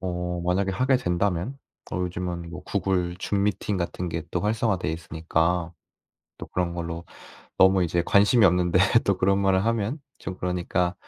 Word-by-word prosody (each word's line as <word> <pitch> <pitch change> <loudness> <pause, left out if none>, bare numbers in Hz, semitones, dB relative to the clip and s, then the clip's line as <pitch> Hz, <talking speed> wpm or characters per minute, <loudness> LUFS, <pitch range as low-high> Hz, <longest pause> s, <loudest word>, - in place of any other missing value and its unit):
어 90 -1 -3
만약에 95 +2 +1
하게 130 +6 +2
된다면 90 +6 -1 0.3
요즘은 90 -1 -3
뭐 85 - -8
구글 90 -3 -1
줌미팅 100 0 -1
같은 90 0 -3
게 85 0 -3
또 90 - -1
활성화 110 -1 +1
되어 85 - -2
있으니까 80 +1 -1 0.7
또 - - -7
그런 90 -1 -2
걸로 85 0 -5 0.5
너무 95 -1 +5
이제 85 +1 0
관심이 105 +2 +5
없는데 90 -1 +3 0.3
또 100 - +2
그런 95 +1 +2
말을 95 -1 +2
하면 115 +5 0 0.2
좀 95 - -6
그러니까 90 0 -1
90 Hz, 315 characters per minute, -25 LUFS, 85-100 Hz, 0.7 s, 너무